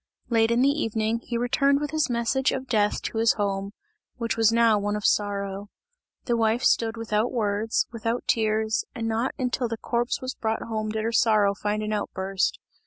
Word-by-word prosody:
Late 225 Hz, -1 st, +3 dB
in 235 Hz, +2 st, +3 dB
the 275 Hz, -, +5 dB
evening, 220 Hz, +1 st, -1 dB
he 235 Hz, 0 st, -4 dB
returned 275 Hz, +4 st, +2 dB
with 295 Hz, -1 st, -3 dB
his 310 Hz, -3 st, 0 dB
message 240 Hz, +3 st, +1 dB
of 265 Hz, 0 st, -3 dB
death 210 Hz, -4 st, +1 dB
to 225 Hz, -, -3 dB
his 225 Hz, 0 st, +4 dB
home, 200 Hz, -1 st, -2 dB, 0.4 s
which 230 Hz, -2 st, -2 dB
was 225 Hz, -1 st, +4 dB
now 230 Hz, -2 st, +4 dB
one 205 Hz, +1 st, -1 dB
of 210 Hz, -, -4 dB
sorrow. 200 Hz, -1 st, 0 dB, 0.6 s
The 240 Hz, -, +1 dB
wife 225 Hz, +2 st, +1 dB
stood 225 Hz, 0 st, +2 dB
without 225 Hz, +1 st, 0 dB
words, 215 Hz, -1 st, 0 dB
without 230 Hz, +1 st, -2 dB
tears, 220 Hz, -3 st, +1 dB
and 225 Hz, -1 st, -3 dB
not 225 Hz, +3 st, -1 dB
until 250 Hz, -1 st, -1 dB
the 230 Hz, 0 st, -4 dB
corpse 240 Hz, +2 st, -1 dB
was 255 Hz, -1 st, -4 dB
brought 220 Hz, 0 st, -2 dB
home 215 Hz, -1 st, -3 dB
did 215 Hz, 0 st, -2 dB
her 225 Hz, -, -1 dB
sorrow 215 Hz, -3 st, +3 dB
find 210 Hz, +1 st, -2 dB
an 215 Hz, 0 st, -2 dB
outburst. 195 Hz, -2 st, -1 dB
225 Hz, 190 wpm, -25 LUFS, 210-235 Hz, 0.6 s, the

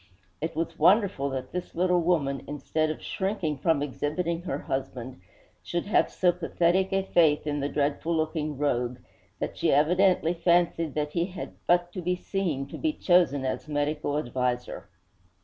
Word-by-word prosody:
It 160 Hz, +1 st, -3 dB
was 165 Hz, 0 st, -3 dB
wonderful 190 Hz, -9 st, +4 dB
that 130 Hz, -1 st, -5 dB
this 180 Hz, 0 st, -5 dB
little 180 Hz, 0 st, +2 dB
woman, 150 Hz, -6 st, 0 dB
instead 155 Hz, +2 st, -1 dB
of 155 Hz, -, -5 dB
shrinking 190 Hz, -7 st, -2 dB
from 160 Hz, -2 st, +2 dB
exhibiting 165 Hz, +4 st, -2 dB
her 165 Hz, -6 st, -3 dB
husband, 130 Hz, -6 st, -5 dB, 0.4 s
should 175 Hz, 0 st, -3 dB
have 205 Hz, -, +3 dB
so 180 Hz, -1 st, +3 dB
pathetic 180 Hz, +2 st, +1 dB
a 195 Hz, 0 st, +1 dB
faith 160 Hz, -6 st, +3 dB
in 145 Hz, -1 st, -1 dB
the 140 Hz, +1 st, -1 dB
dreadful 150 Hz, +3 st, 0 dB
looking 155 Hz, -2 st, -2 dB
rogue 125 Hz, -4 st, 0 dB, 0.4 s
that -, -, -4 dB
she -, -, +2 dB
evidently 175 Hz, +3 st, +3 dB
fancied 170 Hz, -2 st, +1 dB
that 150 Hz, -1 st, -1 dB
he 170 Hz, +1 st, 0 dB
had 185 Hz, -1 st, -7 dB
but 175 Hz, 0 st, +3 dB
to 185 Hz, -, -4 dB
be 180 Hz, +1 st, 0 dB
seen 180 Hz, -7 st, -2 dB
to -, -, -8 dB
be 315 Hz, -1 st, 0 dB
chosen 170 Hz, -, +3 dB
as 130 Hz, +2 st, -3 dB
medical 145 Hz, 0 st, -1 dB
adviser.' 125 Hz, -3 st, -2 dB
160 Hz, 165 wpm, -27 LUFS, 145-175 Hz, 0.4 s, wonderful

